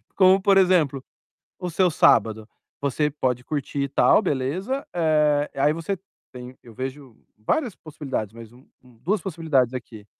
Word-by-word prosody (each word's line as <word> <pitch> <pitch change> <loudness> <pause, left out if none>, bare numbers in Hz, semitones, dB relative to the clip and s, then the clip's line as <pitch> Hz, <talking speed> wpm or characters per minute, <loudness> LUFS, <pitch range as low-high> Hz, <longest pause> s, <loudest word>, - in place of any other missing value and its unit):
Como, 190 0 +5
por 195 0 +4
exemplo, 165 -8 +3 0.6
o 180 - -4
seu 180 +1 +2
sábado, 110 -6 +3 0.3
você 145 +2 0
pode 125 -4 -2
curtir 145 -1 -3
e 140 - -1
tal, 135 - +4
beleza. 185 - -2
Eh, 150 -3 +2
aí 145 +2 +2
você 165 +4 -3 0.4
tem 125 0 -10
eu 115 -2 -14
vejo 130 0 -7 0.2
várias 225 - -1
possibilidades, 135 -9 -5
mas 115 -1 -12
um 125 +2 -19 0.2
um 125 -2 -21
2 195 - -1
possibilidades 155 - 0
aqui. 115 -4 -9
145 Hz, 155 wpm, -23 LUFS, 125-175 Hz, 0.6 s, Como